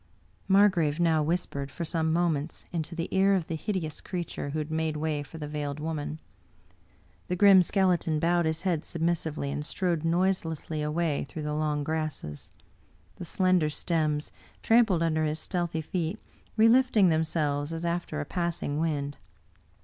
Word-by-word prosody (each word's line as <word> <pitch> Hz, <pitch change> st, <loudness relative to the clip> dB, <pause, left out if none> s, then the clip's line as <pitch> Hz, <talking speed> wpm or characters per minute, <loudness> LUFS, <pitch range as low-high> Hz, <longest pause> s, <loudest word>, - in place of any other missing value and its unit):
Margrave 185 Hz, -6 st, +4 dB
now 165 Hz, -2 st, +3 dB
whispered, 150 Hz, -3 st, -2 dB
for 170 Hz, +5 st, -5 dB
some 160 Hz, -1 st, 0 dB
moments, 165 Hz, -2 st, -1 dB
into 165 Hz, 0 st, -3 dB
the 170 Hz, 0 st, -2 dB
ear 195 Hz, +1 st, +4 dB
of 175 Hz, -4 st, -1 dB
the -, -, -4 dB
hideous 160 Hz, -3 st, -3 dB
creature 175 Hz, -5 st, -4 dB
who 150 Hz, -, -3 dB
had 155 Hz, 0 st, -3 dB
made 160 Hz, -1 st, -1 dB
way 150 Hz, -1 st, -1 dB
for 145 Hz, +3 st, -10 dB
the 150 Hz, -2 st, -5 dB
Veiled 145 Hz, -1 st, -4 dB
Woman. 155 Hz, -1 st, -3 dB, 1.1 s
The 180 Hz, -, -1 dB
grim 195 Hz, 0 st, +7 dB
skeleton 180 Hz, -4 st, +2 dB
bowed 170 Hz, +1 st, +2 dB
his 160 Hz, +1 st, -1 dB
head 175 Hz, -5 st, +1 dB
submis 170 Hz, +1 st, 0 dB
sively, 150 Hz, -3 st, -3 dB
and 145 Hz, -, -3 dB
strode 170 Hz, 0 st, -1 dB
noiselessly 165 Hz, -3 st, 0 dB
away 150 Hz, -1 st, 0 dB
through 155 Hz, -, -6 dB
the 150 Hz, 0 st, -2 dB
long 150 Hz, -1 st, 0 dB
grasses 155 Hz, -, -4 dB, 0.3 s
— 85 Hz, +1 st, -33 dB
^the 175 Hz, -, -5 dB
slender 185 Hz, -4 st, +2 dB
stems, 155 Hz, -2 st, -1 dB, 0.3 s
trampled 225 Hz, -7 st, +4 dB
under 160 Hz, -1 st, +1 dB
his 155 Hz, 0 st, -1 dB
stealthy 170 Hz, -1 st, -2 dB
feet, 165 Hz, 0 st, -2 dB, 0.4 s
relift 235 Hz, +3 st, +5 dB
ing 190 Hz, -4 st, +6 dB
themselves 155 Hz, -2 st, 0 dB
as 165 Hz, +1 st, -4 dB
after 170 Hz, -2 st, -2 dB
a 145 Hz, -, -3 dB
passing 170 Hz, -4 st, -2 dB
wind. 145 Hz, -3 st, -1 dB
160 Hz, 165 wpm, -28 LUFS, 150-175 Hz, 1.1 s, grim